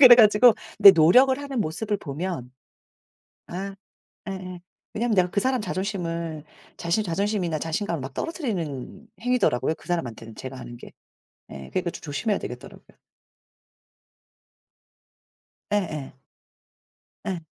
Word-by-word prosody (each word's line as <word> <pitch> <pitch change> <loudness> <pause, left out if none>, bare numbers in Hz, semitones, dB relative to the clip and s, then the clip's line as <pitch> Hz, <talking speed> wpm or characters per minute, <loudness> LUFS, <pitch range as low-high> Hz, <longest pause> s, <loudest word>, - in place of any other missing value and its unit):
그래 250 -3 +11
가지고 215 +1 +7 0.2
근데 200 -1 +11
노력을 185 +11 +6
하는 275 -4 -3
모습을 205 +5 -1
보면 150 -3 -5 1.0
예. 195 +2 -4 0.6
예예. 185 -2 -7 0.3
왜냐하면 230 0 0
내가 180 -1 +4
그 200 - +1
사람 255 0 +1
자존심을 170 -5 -3 0.3
자신의 180 +5 0
자존심이나 180 -2 -1
자신감을 165 0 -2
막 135 +1 -7
떨어뜨리는 205 - -4
행위더라고요, 240 - +1
그 - - -19
사람한테는 115 -10 -4
제가 130 0 -7
하는 120 -1 -9
게. - - -12 0.6
예 70 -1 -9
그러니까 180 -2 -1
좀 - - -10
조심해야 180 +8 -1
되겠더라고요. - - -10 2.7
예예. 155 -10 -2 1.1
예. 185 -3 -2
180 Hz, 300 characters per minute, -25 LUFS, 155-210 Hz, 2.7 s, 그래